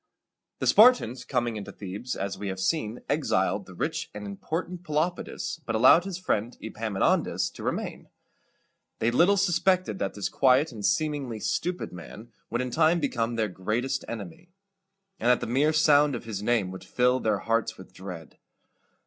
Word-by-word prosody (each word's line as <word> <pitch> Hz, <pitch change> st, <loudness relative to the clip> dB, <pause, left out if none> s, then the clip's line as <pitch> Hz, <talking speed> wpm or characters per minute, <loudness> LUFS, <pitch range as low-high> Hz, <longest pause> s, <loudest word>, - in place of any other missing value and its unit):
The -, -, -3 dB
Spartans, 210 Hz, -, +5 dB
coming 120 Hz, -4 st, -1 dB
into 105 Hz, -1 st, -7 dB
Thebes, 100 Hz, +6 st, -6 dB
as 100 Hz, 0 st, -3 dB
we 105 Hz, -, -6 dB
have 95 Hz, -1 st, -4 dB
seen, 110 Hz, +2 st, -1 dB
exiled -, -, 0 dB
the -, -, -12 dB
rich -, -, -3 dB
and 105 Hz, 0 st, -6 dB
important 165 Hz, -, -4 dB
Pelopidas, 165 Hz, +1 st, -2 dB
but -, -, -3 dB
allowed 130 Hz, +10 st, +6 dB
his 195 Hz, -3 st, -4 dB
friend 120 Hz, -, -2 dB
Epaminondas 110 Hz, -3 st, 0 dB
to -, -, -11 dB
remain. -, -, -4 dB, 0.9 s
They 115 Hz, -, +1 dB
little 175 Hz, +10 st, +4 dB
suspected 185 Hz, -, +1 dB
that 100 Hz, -, -2 dB
this 100 Hz, -, -2 dB
quiet 135 Hz, +3 st, +3 dB
and 110 Hz, -4 st, -8 dB
seemingly 140 Hz, 0 st, 0 dB
stupid 175 Hz, -, -2 dB
man 105 Hz, +6 st, -10 dB, 0.2 s
would 120 Hz, +2 st, -1 dB
in 125 Hz, -1 st, -3 dB
time 160 Hz, +4 st, +3 dB
become 120 Hz, -5 st, -1 dB
their 110 Hz, -1 st, +1 dB
greatest 110 Hz, +8 st, -2 dB
enemy, 115 Hz, -, -8 dB, 0.7 s
and 120 Hz, -, +1 dB
that 125 Hz, -, +5 dB
the -, -, -4 dB
mere 135 Hz, +6 st, +2 dB
sound 150 Hz, -3 st, +4 dB
of -, -, -6 dB
his 105 Hz, -3 st, -4 dB
name 105 Hz, -4 st, +1 dB
would 95 Hz, -, -9 dB
fill 125 Hz, +1 st, +2 dB
their 110 Hz, -4 st, +1 dB
hearts 115 Hz, +2 st, -1 dB
with 95 Hz, -, -13 dB
dread. 90 Hz, -4 st, -9 dB
120 Hz, 165 wpm, -27 LUFS, 105-155 Hz, 0.9 s, allowed